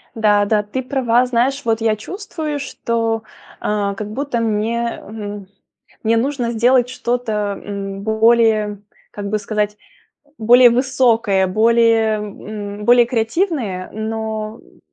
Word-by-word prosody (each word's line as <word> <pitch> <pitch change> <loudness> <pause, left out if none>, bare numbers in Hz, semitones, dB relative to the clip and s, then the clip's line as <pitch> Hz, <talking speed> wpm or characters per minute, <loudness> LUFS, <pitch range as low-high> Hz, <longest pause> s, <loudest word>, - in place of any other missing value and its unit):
Да 210 -2 +3
да, 210 0 +1
ты 210 +6 -4
права. 250 -2 +1
Знаешь, 255 +3 0
вот 225 -1 0
я 220 -1 +2
чувствую, 315 - -5
что, 230 -4 -2 0.4
а, 205 -1 -1
как 210 +1 -6
будто 265 0 -2
мне, 230 +1 -1
эм, 205 -2 -7 0.6
мне 225 +1 +2
нужно 250 -1 -1
сделать 245 +2 +3
что-то, 245 -2 -2 0.3
м, 195 -1 -5
более, 220 -2 +2 0.3
как 205 - -7
бы 215 +1 0
сказать, 210 0 -2 0.6
более 245 +3 +7
высокое, 235 -6 +2
более, 225 +1 +3
м, 210 0 -7
более 240 0 +6
креативное, 230 - -1
но, 220 0 -4
м, - - -23
225 Hz, 125 wpm, -19 LUFS, 210-245 Hz, 0.6 s, более